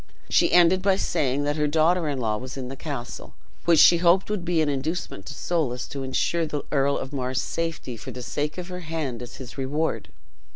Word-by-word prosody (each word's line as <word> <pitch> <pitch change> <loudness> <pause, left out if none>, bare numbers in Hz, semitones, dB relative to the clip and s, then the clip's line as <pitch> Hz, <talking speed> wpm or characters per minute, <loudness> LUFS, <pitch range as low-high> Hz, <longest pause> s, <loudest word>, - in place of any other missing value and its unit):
She - - +4
ended 175 +1 +5
by 195 0 +3
saying 145 -6 0
that 145 +1 -1
her 150 0 +2
daughter 160 +3 +2
in 140 - -2
law 110 -3 0
was 130 +4 -7
in 125 -2 -5
the 135 - -6
castle, 135 -4 -6 0.3
which 170 -1 +5
she 170 - +8
hoped 180 +4 +3
would 205 -4 -2
be 175 -1 +1
an 155 - +2
inducement 145 - -3
to 150 - -6
Soulis 145 -8 -1
to 140 - -5
insure 160 +5 0
the 150 -1 -3
Earl 140 -1 +2
of 135 - -6
Mar's 130 -2 -1
safety 165 -4 -3
for 110 - -9
the 125 - -7
sake 150 +6 -3
of 180 0 -6
her 180 0 -5
hand 155 -8 -4
as 125 - -8
his 130 +1 -9
reward. 145 +5 -1
150 Hz, 215 wpm, -25 LUFS, 130-170 Hz, 0.3 s, she